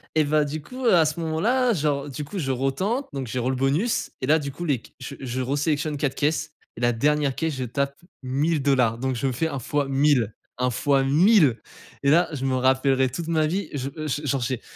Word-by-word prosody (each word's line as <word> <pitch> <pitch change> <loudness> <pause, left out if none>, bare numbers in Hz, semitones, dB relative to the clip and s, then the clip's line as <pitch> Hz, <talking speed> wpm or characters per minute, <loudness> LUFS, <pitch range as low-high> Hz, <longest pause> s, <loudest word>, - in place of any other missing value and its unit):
et 155 - +4
bah 150 0 +2
du 150 +2 -4
coup 255 - -7
à 170 -8 +5
ce 155 +2 -2
moment 160 -1 -2
là 250 +2 +3
genre, 145 -4 -1
du 145 +2 -5
coup 175 +8 -7
je 135 -7 -1
retente 160 - -1
donc 135 -3 -4
j'ai 125 +2 -3
re 125 +2 0
le 130 - 0
bonus. 140 - 0
Et 130 - -2
là 155 - +5
du 140 -1 -5
coup 175 +6 -7
les 145 -6 +1
c - - -17
je 135 +2 -7
je 130 -1 -3
re 135 +3 -1
sélectionne 150 0 0
4 140 -1 -1
caisses 155 +1 -1 0.2
et - - -7
la 120 - +3
dernière 145 +3 +1
caisse 160 -3 -2
je 130 - -3
tape 140 +3 -2 0.3
1000$ 135 -4 +1
donc 130 0 -1
je 120 - -3
me - - 0
fais 150 +7 -1
un 150 - -4
fois 145 +3 -1
1000, 135 -6 +2 0.2
un 125 - +2
fois 135 +3 +1
1000. 150 - +4 0.4
Et 140 - +4
là 170 +2 +4
je 135 -2 -3
me 130 - +1
rappellerai 130 0 +2
toute 160 +6 -5
ma 155 -2 +2
vie, 190 +6 -2
je 135 -1 -3
je 155 -1 -4
je 150 - -5
genre 135 0 0
j'ai 125 0 -2
140 Hz, 245 wpm, -24 LUFS, 130-155 Hz, 0.4 s, à